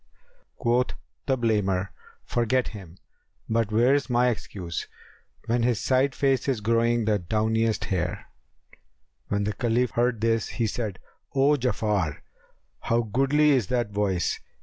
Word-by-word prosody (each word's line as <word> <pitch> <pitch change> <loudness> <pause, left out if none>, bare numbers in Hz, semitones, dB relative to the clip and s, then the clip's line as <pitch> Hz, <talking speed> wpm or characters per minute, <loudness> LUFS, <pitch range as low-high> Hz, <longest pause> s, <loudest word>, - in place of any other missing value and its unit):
Quoth 125 +1 +1 0.3
the 135 -2 +2
blamer, 100 -5 0 0.4
'Forget 120 +2 +1
him! 95 -5 -11 0.5
But 115 -1 0
where's 130 +6 +3
my 125 0 +3
excuse 90 -7 -5 0.3
* - - -34
When 120 +1 +1
his 120 -2 +1
side 130 +1 +1
face 135 -2 +1
is 130 -5 +1
growing 115 +1 +2
the 105 -1 +2
downiest 110 +4 0
hair?[FN#279]'" 90 -4 -6 0.5
When 100 0 0
the 105 +1 -1
Caliph 120 0 0
heard 120 -2 0
this, 115 0 +1
he 115 - -2
said, 105 -3 -3 0.4
"O 135 +2 +4
Ja'afar, 105 - 0 0.6
how 115 +1 +1
goodly 135 +7 +3
is 125 -9 +2
that 120 -2 -1
voice!" 100 -3 0
115 Hz, 135 wpm, -26 LUFS, 105-125 Hz, 0.6 s, O